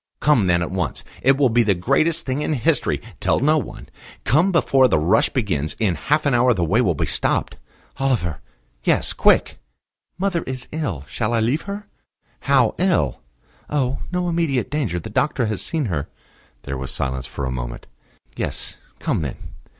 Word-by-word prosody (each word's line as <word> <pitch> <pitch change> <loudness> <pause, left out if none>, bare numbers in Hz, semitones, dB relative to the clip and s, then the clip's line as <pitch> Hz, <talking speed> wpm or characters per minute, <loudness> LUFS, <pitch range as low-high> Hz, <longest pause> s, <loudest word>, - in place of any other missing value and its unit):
"Come 125 -10 +3
then 85 -1 +3
at 85 - -4
once. 90 -7 -2 0.2
It 135 +1 +4
will 135 -3 +4
be 120 +1 +3
the 105 -4 +2
greatest 155 - +1
thing 135 +2 -1
in 155 - 0
history. 125 -6 +1 0.2
Tell - - +2
no 155 +4 +3
one. 125 - -8 0.4
Come 160 - +3
before 135 -6 +4
the 105 - +2
rush 85 +9 +3
begins. 80 - -1
In 105 -5 +1
half 145 - 0
an 140 - +2
hour 120 0 +4
the 90 - 0
way 100 +9 +2
will 90 -9 +1
be - - -1
stopped." - - 0 0.4
"Oliver." 120 - 0 0.4
"Yes? - - +2
Quick." - - +3 0.6
"Mother 185 -2 0
is 130 0 -4
ill. 130 - -3
Shall 110 - -2
I 115 - +2
leave 125 +8 +1
her?" 200 +1 -5 0.5
"How 130 -4 +3
ill?" 175 - +1 0.5
"Oh, 135 -3 0
no 180 0 -1
immediate 165 -7 0
danger. 125 - -1
The 95 +6 -8
doctor 130 +1 +1
has 105 -2 -2
seen 160 -4 -1
her." 80 -9 -2 0.6
There 70 -1 -4
was 65 0 -3
silence 65 -1 -2
for 70 - -5
a 65 - -2
moment. - - -5 0.5
"Yes; - - -3 0.2
come - - -1
then. 70 -5 -3
120 Hz, 180 wpm, -21 LUFS, -, 0.6 s, It